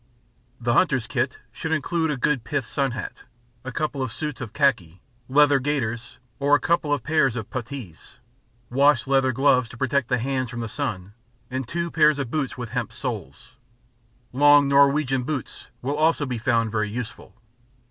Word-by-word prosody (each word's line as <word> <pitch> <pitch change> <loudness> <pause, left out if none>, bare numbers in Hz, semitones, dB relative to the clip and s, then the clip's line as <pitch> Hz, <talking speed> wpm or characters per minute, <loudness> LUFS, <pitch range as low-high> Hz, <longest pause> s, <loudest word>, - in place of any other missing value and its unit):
The 120 0 0
hunter's 130 -6 +2
kit 130 +2 -2
should 160 - -5
include 160 +2 0
a 150 - -1
good 125 -1 0
pith 145 0 -2
sunhat, 135 0 -3 0.4
a 130 - -5
couple 150 0 -2
of 130 -3 -2
suits 150 -1 -5
of 115 -5 -6
khaki, 95 - +1 0.3
leather 145 +1 +5
gaiters 120 -4 -3 0.2
or 145 +1 +4
a - - +2
couple 170 -3 0
of 145 -5 0
pairs 145 -4 +2
of 110 -3 -6
puttees, 120 - -7 0.5
wash 140 +4 +4
leather 135 -1 +2
gloves 130 -2 +3
to 120 - -12
protect 135 0 0
the 125 - +1
hands 130 0 -2
from 120 -1 -5
the 115 - -3
sun, 105 -7 -4 0.4
and 130 -1 -3
two 170 +4 -3
pairs 155 -2 +4
of 135 -4 -4
boots 140 -5 -2
with 120 -2 -5
hemp - - -2
soles; 120 - -6 0.8
long 145 +1 +6
Norwegian 140 -1 +3
boots 130 -3 -5 0.2
will 140 +3 -1
also 155 -1 +2
be 125 -3 -3
found 115 -2 +1
very 105 -1 -1
useful. 110 -2 -7
135 Hz, 170 wpm, -24 LUFS, 120-145 Hz, 0.8 s, long